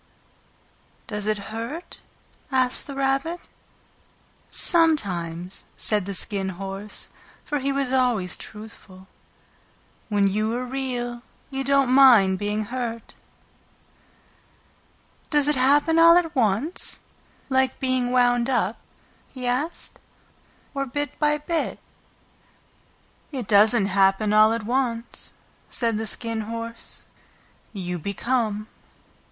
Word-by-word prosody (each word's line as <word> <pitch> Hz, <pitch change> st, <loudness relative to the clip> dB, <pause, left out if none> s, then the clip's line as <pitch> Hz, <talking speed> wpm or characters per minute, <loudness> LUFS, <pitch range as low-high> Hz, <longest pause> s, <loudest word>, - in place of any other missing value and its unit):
"Does 210 Hz, -1 st, -4 dB
it 215 Hz, 0 st, +1 dB, 0.2 s
hurt?" 240 Hz, +10 st, -6 dB, 0.5 s
asked 255 Hz, -1 st, +1 dB
the 280 Hz, -, -7 dB
Rabbit. 275 Hz, +5 st, -1 dB, 1.0 s
"Sometimes," 185 Hz, -, +1 dB
said 210 Hz, -3 st, 0 dB
the 200 Hz, -, -3 dB
Skin 195 Hz, 0 st, 0 dB
Horse, 195 Hz, +2 st, -5 dB, 0.4 s
for 295 Hz, -1 st, -1 dB
he 275 Hz, +1 st, 0 dB
was 275 Hz, -2 st, -1 dB
always 240 Hz, -9 st, +2 dB
truthful. 210 Hz, -3 st, -11 dB, 1.0 s
"When 205 Hz, -2 st, +3 dB
you 215 Hz, +3 st, 0 dB
are 250 Hz, +1 st, -3 dB
Real 245 Hz, -2 st, -4 dB, 0.3 s
you 270 Hz, 0 st, -2 dB
don't 275 Hz, -1 st, +3 dB
mind 230 Hz, -9 st, +6 dB
being 210 Hz, +1 st, -1 dB
hurt." 235 Hz, -1 st, -5 dB, 2.2 s
"Does 295 Hz, -2 st, +3 dB
it 295 Hz, -, +3 dB
happen 290 Hz, +5 st, +3 dB
all 335 Hz, +1 st, +8 dB
at 330 Hz, -3 st, 0 dB
once, 235 Hz, -, 0 dB, 0.5 s
like 265 Hz, -1 st, +1 dB
being 255 Hz, -2 st, +1 dB
wound 245 Hz, 0 st, +3 dB
up," 225 Hz, -4 st, 0 dB, 0.5 s
he 255 Hz, -2 st, -7 dB
asked, 260 Hz, +7 st, -2 dB, 0.7 s
"or 275 Hz, -1 st, -2 dB
bit 290 Hz, +2 st, -4 dB
by 300 Hz, 0 st, +2 dB
bit?" 315 Hz, +2 st, -2 dB, 1.5 s
"It 255 Hz, -7 st, -4 dB
doesn't 210 Hz, +1 st, +5 dB
happen 195 Hz, +2 st, +2 dB
all 215 Hz, +1 st, +6 dB
at 230 Hz, -1 st, -2 dB
once," 240 Hz, 0 st, -2 dB, 0.4 s
said 230 Hz, -3 st, +1 dB
the 220 Hz, -, -2 dB
Skin 230 Hz, +1 st, -1 dB
Horse. 230 Hz, 0 st, -5 dB, 0.7 s
"You 180 Hz, -4 st, -4 dB
become. 215 Hz, +3 st, -1 dB
240 Hz, 110 wpm, -24 LUFS, 210-270 Hz, 2.2 s, all